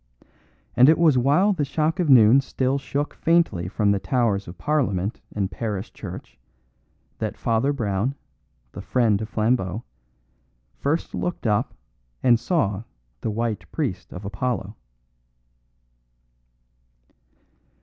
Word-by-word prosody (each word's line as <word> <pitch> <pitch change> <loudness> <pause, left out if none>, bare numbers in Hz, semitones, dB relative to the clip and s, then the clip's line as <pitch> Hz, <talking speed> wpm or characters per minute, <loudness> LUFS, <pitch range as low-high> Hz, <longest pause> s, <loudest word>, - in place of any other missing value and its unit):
And 125 +3 +7
it 160 - +5
was 160 -5 +4
while 155 +11 +3
the 160 -6 -1
shock 155 +5 -1
of 170 -4 +1
noon 125 0 +7
still 130 +1 -1
shook 140 +2 -3
faintly 165 - +1
from 105 +1 +1
the 100 - +1
towers 115 -5 0
of 85 +1 -9
Parliament 115 - -1
and 100 -2 -2
parish 105 -2 -4
church 90 - -9 0.8
that - - -3
Father 115 +5 +1
Brown, 115 0 -1 0.6
the - - -8
friend 110 -5 +1
of 110 - -5
Flambeau, 110 -2 0 0.9
first 155 +4 -2
looked 175 -6 -3
up 105 -2 0 0.5
and 120 -2 +5
saw 115 - 0 0.4
the - - -3
white 110 -1 -3
priest - - -3
of 90 +2 -8
Apollo. 105 0 -3
120 Hz, 120 wpm, -24 LUFS, 105-140 Hz, 0.9 s, And